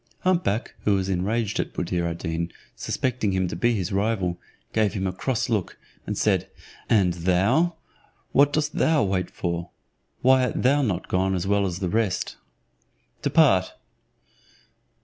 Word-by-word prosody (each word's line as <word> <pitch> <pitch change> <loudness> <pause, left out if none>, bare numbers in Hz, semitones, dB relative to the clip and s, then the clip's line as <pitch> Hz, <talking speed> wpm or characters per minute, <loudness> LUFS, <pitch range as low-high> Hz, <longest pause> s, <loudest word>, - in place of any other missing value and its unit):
Hump 185 -1 +2
back, 110 -4 -1
who 105 - +3
was 95 0 -1
enraged 105 +4 -1
at - - -2
Buddir 85 0 -1
ad 85 0 -3
Deen, 85 0 -3 0.2
suspecting 120 -6 -1
him 95 -1 +1
to - - -4
be 120 0 +2
his 95 -4 -2
rival, 100 -3 0 0.3
gave 110 -3 +2
him 95 -2 -2
a 95 - -1
cross 120 +5 -1
look, 110 -6 -2 0.3
and - - -2
said, - - +1 0.4
"And 95 -5 +4
thou, 95 - +2 0.6
what 140 +1 +5
dost 150 0 0
thou 160 -3 +3
wait 95 -2 -1
for? 85 -1 -3 0.5
Why 130 0 +5
art - - -2
thou 140 +3 +4
not 105 -9 -1
gone 95 +1 +1
as 90 0 -2
well 100 0 +2
as 90 -1 -4
the 95 - 0
rest? 105 -2 -1 0.8
Depart!" 120 - +3
100 Hz, 160 wpm, -25 LUFS, 90-120 Hz, 0.8 s, what